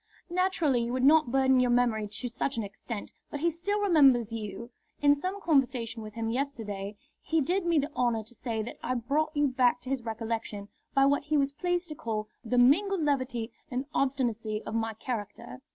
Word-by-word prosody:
"Naturally 345 -9 +2
you 235 +1 -3
would 255 0 0
not 300 -2 +5
burden 265 -1 +4
your 250 -1 +3
memory 240 -3 +2
to 210 +4 -4
such 255 +3 -3
an 225 - 0
extent, 205 +2 -7 0.2
but 290 - -5
he 340 +1 +2
still 395 +6 -1
remembers 275 - +4
you. 220 +1 -6 0.3
In 285 0 +5
some 370 +7 -3
conversation 255 - +1
with 215 0 -9
him 225 -1 -2
yesterday 220 -7 -3 0.3
he 325 - +1
did 350 +5 0
me 335 -1 +3
the 290 +1 0
honour 235 -4 +1
to 225 +3 -11
say 225 -2 -3
that 235 - -8
I 255 - -1
brought 295 +6 -1
you 290 0 +4
back 250 -1 +3
to 255 +2 -6
his 270 -2 0
recollection 225 -2 -4 0.3
by 275 0 +6
what 285 +1 +2
he 305 0 +1
was 275 -1 +2
pleased 355 +4 -1
to - - -3
call 215 -5 -3 0.2
the 245 +1 -1
mingled 340 +9 +4
levity 255 -5 -1 0.2
and 255 +2 -2
obstinacy 230 -6 -1
of - - -5
my 225 -1 -1
character. 235 +2 -6
255 Hz, 200 wpm, -29 LUFS, 230-290 Hz, 0.3 s, by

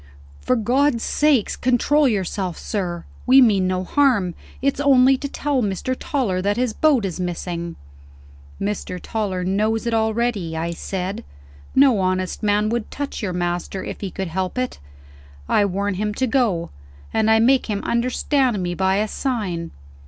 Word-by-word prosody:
"For 255 - +1
God's 250 +2 +1
sake, 290 -7 +1
control 270 +4 +3
yourself, 190 -4 -2
sir! 175 -5 -3 0.2
We 260 +2 +7
mean 205 -7 +4
no 185 0 -1
harm. 220 -6 +2 0.3
It's 275 0 0
only 270 -2 +5
to 280 - -4
tell 285 -2 -1
Mr. 210 +5 -1
Toller 235 -11 -1
that 205 +3 0
his 245 -2 0
boat 280 -7 +3
is 185 -1 -4
missing." 170 -1 -4 0.8
"Mr. 200 -3 -3
Toller 195 -3 -3
knows 215 +5 0
it 235 - -1
already," 220 -6 0
I 165 +1 -2
said. 185 +2 -4 0.5
"No 265 -6 +5
honest 185 0 -1
man 210 0 +2
would 235 -1 -2
touch 285 -2 -5
your 195 -4 -2
master 175 +2 -2
if - - -7
he 195 - -3
could 190 0 -4
help 185 +5 -3
it. 255 0 -2 0.7
I 205 - +3
warn 200 +1 -1
him 210 +2 -2
to 260 - +1
go; 220 -10 0 0.4
and 220 0 +2
I 220 - +6
make 255 +4 +3
him 205 -2 -2
understand 250 0 +1
me 175 0 -2
by 190 +2 +1
a 210 +2 +1
sign." 205 -10 -3
210 Hz, 160 wpm, -21 LUFS, 185-250 Hz, 0.8 s, We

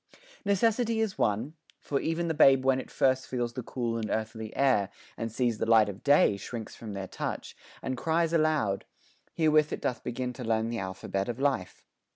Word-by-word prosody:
Necessity 225 +3 +2
is 220 -3 -1
one; 115 +7 0 0.3
For 140 - -2
e'en 165 +1 -1
the 165 - 0
babe 135 -3 +5
when 130 -1 +3
first 130 -1 +1
it - - -18
feels 120 -2 -2
the 130 - -4
cool 120 -1 -3
And 110 -2 -3
earthly 110 0 -3
air, 125 -8 +3 0.3
and 115 0 -4
sees 120 -1 0
the - - -1
light 110 -2 +6
of 100 0 -8
day, 145 -8 +5
Shrinks 110 +2 -7
from 110 -3 -8
their 95 -1 -5
touch, - - -5 0.3
and 130 - -2
cries 165 +5 0
aloud 155 -12 +1 0.5
herewith 155 -1 +3
It - - -4
doth 120 -3 -2
begin 125 +1 -3
to 125 - -7
learn 115 0 0
the 115 - -2
alphabet 95 +2 -3
Of 120 +1 -4
life. 135 -10 -1
125 Hz, 190 wpm, -29 LUFS, 110-150 Hz, 0.5 s, light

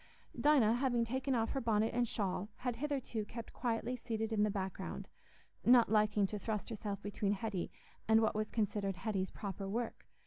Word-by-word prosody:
Dinah, 250 -7 +4
having 245 -3 +2
taken 260 +3 0
off 225 -1 +1
her 270 - -1
bonnet 220 -1 +2
and 240 0 +2
shawl, 200 -2 -1
had 245 -2 -3
hitherto 265 -5 -2
kept 230 +2 -8
quietly 240 0 -1
seated 225 -2 -3
in 210 - +2
the 210 - +4
background, 190 -2 -4 0.6
not 240 -3 +6
liking 210 -1 +4
to 210 +2 -3
thrust 215 +2 -3
herself 205 -3 -4
between 205 0 0
Hetty 200 -3 -2 0.4
and 220 0 +6
what 220 -1 +2
was 215 0 -1
considered 205 -3 0
Hetty's 190 0 -1
proper 195 -1 -5
work. 230 +3 -3
220 Hz, 175 wpm, -35 LUFS, 205-235 Hz, 0.6 s, not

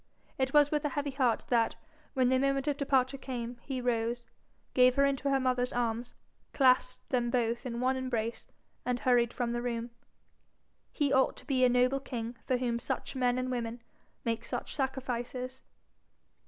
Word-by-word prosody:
It 265 0 +1
was 295 0 +5
with 300 -1 +1
a 295 - +1
heavy 285 0 -2
heart 255 -4 +1
that, 230 -2 +2 0.4
when 255 -2 +3
the 260 0 +3
moment 275 +1 +1
of 290 - +2
departure 275 -1 +1
came, 245 -2 -5
he 265 0 -4
rose, 240 0 -1 0.5
gave 255 0 +5
her 280 0 +4
into 275 0 0
her 270 -1 +3
mother's 250 -1 +1
arms, 240 0 -2 0.4
clasped 255 -1 +3
them 245 -2 +1
both 235 0 0
in 235 -1 -4
one 255 +1 +2
embrace, 235 -3 -2 0.4
and 250 -1 -1
hurried 240 -2 +3
from 240 -1 -2
the 240 0 -1
room. 235 -1 -3 1.0
He 285 -3 +1
ought 265 -1 +3
to - - -11
be 260 -3 +2
a 250 - +6
noble 250 +2 +3
king 240 -3 -5
for 255 - +2
whom 240 -2 -1
such 240 - -4
men 250 -1 +2
and 255 0 -1
women 235 -1 -3 0.5
make 230 0 -1
such - - -4
sacrifices. 255 -1 -3
255 Hz, 175 wpm, -31 LUFS, 240-265 Hz, 1.0 s, a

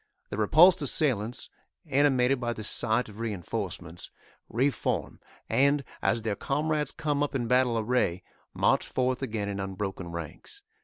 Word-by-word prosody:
The - - -3
repulsed 165 - +6
assailants, 125 -5 0 0.4
animated 135 -2 +3
by 120 -1 -1
the 110 - -7
sight 110 +3 +2
of 105 0 -12
reinforcements, 90 -5 -4 0.4
reform, 130 +2 -1 0.3
and, 140 +4 +3 0.2
as 115 - +1
their 110 -2 -1
comrades 150 +5 -1
come 145 -2 -1
up 145 -1 -1
in 120 -3 0
battle 125 -1 +3
array, 110 -6 0 0.3
march - - +2
forth 130 0 0
again 110 -6 -2
in 100 -1 -3
unbroken 95 -1 -4
ranks. 85 - -8
120 Hz, 140 wpm, -28 LUFS, 105-140 Hz, 0.4 s, repulsed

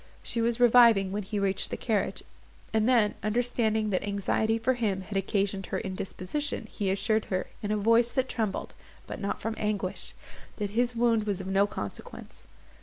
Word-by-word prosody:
She 230 - -1
was 235 +1 +1
reviving 235 -5 +6
when 205 +2 -2
he 205 +1 -4
reached 195 -1 0
the - - -4
carriage; 220 -4 -1 0.5
and 220 +2 +2
then, 230 -5 +4
understanding 220 -1 +1
that 185 - +1
anxiety 205 +2 0
for 230 +3 +1
him 210 -6 -1
had 195 +2 -8
occasioned 195 0 -1
her - - -2
indisposition, 195 +9 -4
he 200 -2 -2
assured 215 +3 +1
her, 185 -1 -2 0.2
in 205 - -3
a 215 - +1
voice 230 +3 +4
that 260 -1 +1
trembled, 220 -6 -3 0.3
but - - -7
not 200 - -2
from 225 - -3
anguish, 205 -3 -1 0.4
that 205 -2 -3
his 240 +2 +1
wound 230 -2 +2
was 200 -2 -1
of 190 - -5
no 195 +1 +2
consequence. 100 - -8
210 Hz, 180 wpm, -28 LUFS, 195-230 Hz, 0.5 s, reviving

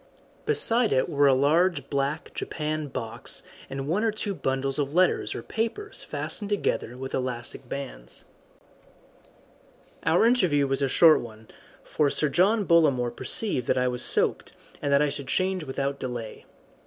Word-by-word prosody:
Beside 245 - +3
it 130 - +2
were 145 0 +3
a 135 - +5
large 150 +2 +2
black 140 +2 -2
japanned 155 -2 -4
box 115 -3 -4 0.3
and 135 0 -5
one 185 +8 0
or 225 - +2
two 210 -1 -3
bundles 135 -4 -2
of 145 +1 -2
letters 185 +1 +2
or - - -6
papers 315 - -3
fastened 205 -2 -3
together 160 - -1
with 130 +1 -7
elastic 125 0 -4
bands. 130 - -7 1.8
Our 175 +7 +3
interview 180 - +3
was 135 0 -1
a 135 - +1
short 160 +3 +6
one, 110 -2 -12 0.3
for 150 -2 +1
Sir 150 +1 0
John 200 +7 +2
Bollamore 140 -8 +3
perceived 165 - 0
that - - +2
I 125 0 +2
was 125 -1 -2
soaked, - - +1 0.3
and 145 - -1
that 140 +1 +5
I 150 - +1
should 140 -1 -6
change 185 +1 0
without 140 +1 -3
delay. 120 -3 -6
140 Hz, 155 wpm, -26 LUFS, 130-180 Hz, 1.8 s, short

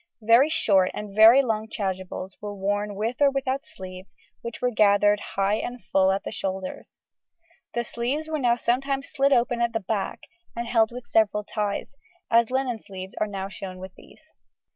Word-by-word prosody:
Very 235 +7 +6
short 195 - +3
and 210 -1 -6
very 225 +5 +8
long 220 -3 -1
"chasubles" 190 -2 -4
were 205 -1 -5
worn 205 +1 -2
with 225 +4 -2
or 285 - +6
without 275 +1 -2
sleeves 185 -8 -10 0.3
which 235 -1 -7
were 250 0 0
gathered 205 -1 +4
high 200 +1 -1
and 245 +2 -5
full 190 -4 +2
at 195 +1 -1
the - - -5
shoulders. 190 -1 -5 0.8
The 235 - 0
sleeves 255 +7 -3
were 315 -1 -2
now 240 -3 +3
sometimes 270 +3 -1
slit 275 0 +2
open 240 -2 +2
at 235 0 +1
the 225 - 0
back 205 0 -3 0.3
and 235 0 -4
held 225 -2 +3
with 245 0 -8
several 210 -2 +2
ties, 210 +3 -3 0.4
as 230 0 +4
linen 255 -3 -1
sleeves 190 -1 -9
are 215 - +2
now 195 -2 -4
shown 190 -1 -8
with 185 0 -9
these. 315 0 -19
220 Hz, 180 wpm, -25 LUFS, 195-245 Hz, 0.8 s, very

